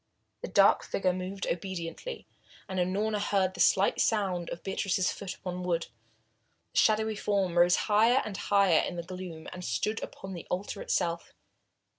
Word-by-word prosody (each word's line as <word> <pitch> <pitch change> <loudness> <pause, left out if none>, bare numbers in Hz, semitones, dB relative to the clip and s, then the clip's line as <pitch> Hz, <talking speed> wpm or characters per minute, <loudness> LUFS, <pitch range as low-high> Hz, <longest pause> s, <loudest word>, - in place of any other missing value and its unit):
The - - -4
dark - - +5
figure 185 -2 0
moved 185 +1 -4
obediently, 180 - -4 0.4
and 190 -1 -3
Unorna 205 +4 0
heard 190 -2 +1
the - - -11
slight 195 +1 +4
sound 190 -6 0
of 170 - -7
Beatrice's 190 -1 0
foot 195 -3 -6
upon 180 -1 -5
the 180 - -5
wood. 170 -1 -1 0.8
The - - +2
shadowy 220 0 +3
form 200 -4 0
rose 175 +1 +5
higher 225 +5 +4
and 210 -2 -5
higher 200 -4 +3
in 175 - -2
the 170 - -4
gloom, 180 -3 -8
and 180 - -8
stood 180 - -1
upon 190 0 -7
the 170 - -8
altar 195 +2 -3
itself. 170 0 -1
185 Hz, 165 wpm, -29 LUFS, 180-205 Hz, 0.8 s, dark